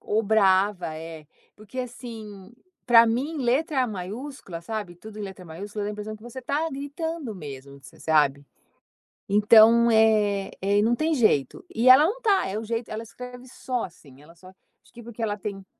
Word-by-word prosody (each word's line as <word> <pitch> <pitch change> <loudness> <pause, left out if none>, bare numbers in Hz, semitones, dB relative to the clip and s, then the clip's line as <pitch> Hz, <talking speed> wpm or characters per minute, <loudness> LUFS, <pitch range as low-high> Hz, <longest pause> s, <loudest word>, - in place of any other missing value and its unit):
Ou 215 +2 0
brava, 195 -4 +2
é. 160 -1 -9 0.3
Porque 215 +4 -11
assim, 225 -5 -9 0.3
pra 235 -2 +7
mim 275 +8 -1
letra 260 +2 +1
maiúscula, 205 - -7
sabe, 205 -2 -5
tudo 215 +3 -11
em - - -5
letra 190 -2 -8
maiúscula 205 +6 -6
da 205 - -2
a - - -5
impressão 210 +1 -7
que 215 - -20
você 240 +2 -8
tá 295 +6 -1
gritando 285 - -5
mesmo, 140 -4 -10
você - - -15
sabe. 145 -3 +2 0.8
Então, 220 +3 +6
eh, 210 -3 +3
eh 200 +2 +1
e - - +4
não 230 +2 +2
tem 315 +4 0
jeito, 215 - +1
e 250 -1 +3
ela 260 +3 +9
não 450 +8 -2
tá 405 -5 +2
é 205 +3 -3
o - - -6
jeito 230 +1 -4
ela 215 +1 -4
escreve 250 +2 -11
só 250 -1 -4
assim, 140 -5 -16
ela 165 +3 -17
só 185 +2 -15
acho 190 - -26
que 235 - -11
porque 235 0 -12
ela 205 -2 -1
tem. 195 -2 -7
215 Hz, 185 wpm, -25 LUFS, 190-245 Hz, 0.8 s, ela